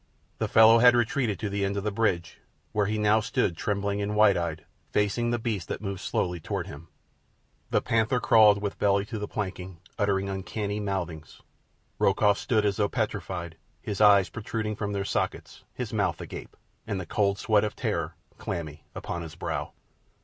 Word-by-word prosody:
The - - 0
fellow 110 +1 +7
had 125 +1 +7
retreated 120 -3 +1
to 105 - -3
the 100 0 -2
end 100 +1 -1
of 100 - -2
the 105 - -1
bridge, 95 -5 -1 0.3
where 105 -2 +1
he 110 +1 -1
now 105 +1 +4
stood 100 -5 0
trembling 100 +2 -1
and 105 +1 -2
wide 105 -2 +6
eyed, 85 -2 -3 0.2
facing 105 +3 +1
the 120 - +1
beast 110 -7 -3
that - - -4
moved 100 -2 -5
slowly 90 +2 -1
toward - - -3
him. 75 +4 -10 0.8
The - - +1
panther 115 +2 +1
crawled 105 -3 +5
with 100 - -3
belly 100 0 +2
to 110 +1 -5
the 105 - -4
planking, 95 -4 -5 0.2
uttering 100 -1 +1
uncanny 100 +2 -3
mouthings. 90 -6 -4 0.6
Rokoff 100 +1 +3
stood 110 -3 +1
as 100 -1 +1
though 105 -1 +1
petrified, 95 -7 -3 0.2
his 105 -1 -4
eyes 100 -3 +6
protruding 110 -1 -3
from 105 -1 -3
their 100 -1 -2
sockets, - - -3
his 120 -3 -5
mouth 100 -6 0
agape, - - -8 0.3
and 100 -2 -2
the 90 - -5
cold 100 +2 +1
sweat 105 -1 +2
of 105 - -2
terror - - -2 0.2
clammy 75 -3 -5
upon 85 - -4
his 80 0 -8
brow. 85 - -4
100 Hz, 180 wpm, -27 LUFS, 95-110 Hz, 0.8 s, fellow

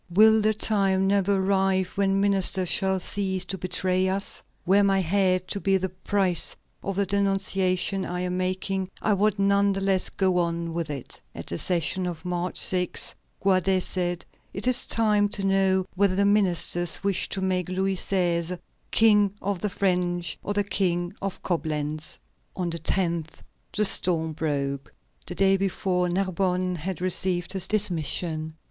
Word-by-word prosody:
Will 220 +4 +5
the 215 +1 +2
time 195 -3 +1
never 200 0 +2
arrive 190 -1 +1
when 195 0 0
ministers 195 -2 +2
shall 190 -1 +2
cease 190 -1 -1
to 190 - -3
betray 185 +1 0
us? 195 +1 -2 0.2
Were 195 +3 +4
my 195 -1 +3
head 185 0 +1
to 200 - -3
be 195 0 +2
the 190 0 -3
price 185 -1 0 0.3
of 195 - -4
the 200 +1 +1
denunciation 195 -1 0
I 180 0 -4
am 180 0 -2
making, 185 +1 -2
I 215 - +1
would 205 +1 +1
none 200 0 +2
the 195 - -3
less 195 -1 +2
go 185 -2 +1
on 170 -1 -2
with 165 -2 -3
it." 140 -4 -7
At - - -7
the 85 - -4
session 180 +1 0
of 170 -2 -6
March 180 0 -3
6, 180 -1 0 0.3
Guadet 190 -1 +2
said: 175 -2 -2 0.3
"It 195 - -3
is 255 0 +1
time 210 -2 +2
to 200 -1 -4
know 190 -1 +2
whether 190 0 +2
the 200 +1 +2
ministers 180 -4 +1
wish 200 -2 0
to 190 - -1
make 185 -2 -1
Louis 190 +1 0
XVI. 175 -2 0 0.3
King 210 -3 +4
of 200 -1 -3
the 210 - -2
French, 180 -2 -1
or 205 - -4
the 205 - +2
King 175 -3 0
of 195 -1 -5
Coblentz." 155 -3 -2 0.4
On 180 -2 -2
the 170 - -4
10th 170 -2 -2 0.3
the 210 - 0
storm 165 -5 +4
broke. 140 -3 -3 0.4
The - - -5
day 195 0 +3
before, 185 -2 -1
Narbonne 185 0 -1
had 180 +2 -5
received 180 0 -1
his 190 -1 -3
dismission. 160 -5 -1
190 Hz, 165 wpm, -25 LUFS, 175-195 Hz, 0.4 s, Will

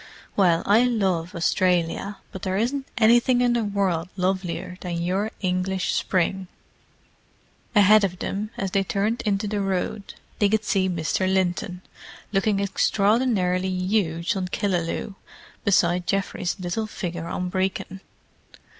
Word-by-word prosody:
"Well, 175 -4 +3
I 215 +4 +5
love 190 -7 0
Australia, 180 +3 +1
but 190 - -8
there 190 0 -1
isn't 265 +5 -1
anything 240 +2 +4
in 245 -1 +3
the 235 -1 +1
world 190 -5 -1
lovelier 185 -1 -2
than 175 -2 -3
your 190 +5 0
English 185 0 0
spring!" 190 +1 0 1.3
Ahead 210 +1 +6
of 185 -2 -1
them, 205 +4 -3
as 195 -1 -2
they 195 0 +2
turned 205 +4 -1
into 200 0 0
the 205 0 -1
road, 195 +1 -3 0.2
they 205 - +4
could 220 +1 +1
see 190 -2 +1
Mr. 180 +2 0
Linton, 180 -1 -1 0.5
looking 200 0 +1
extraordinarily 200 -2 +1
huge 185 -1 0
on 185 -1 -2
Killaloe, 180 0 -2 0.5
beside 180 -3 +2
Geoffrey's 195 -1 -1
little 185 +5 -2
figure 175 -5 -5
on 180 +1 -3
Brecon. 190 0 -2
190 Hz, 130 wpm, -24 LUFS, 180-205 Hz, 1.3 s, Ahead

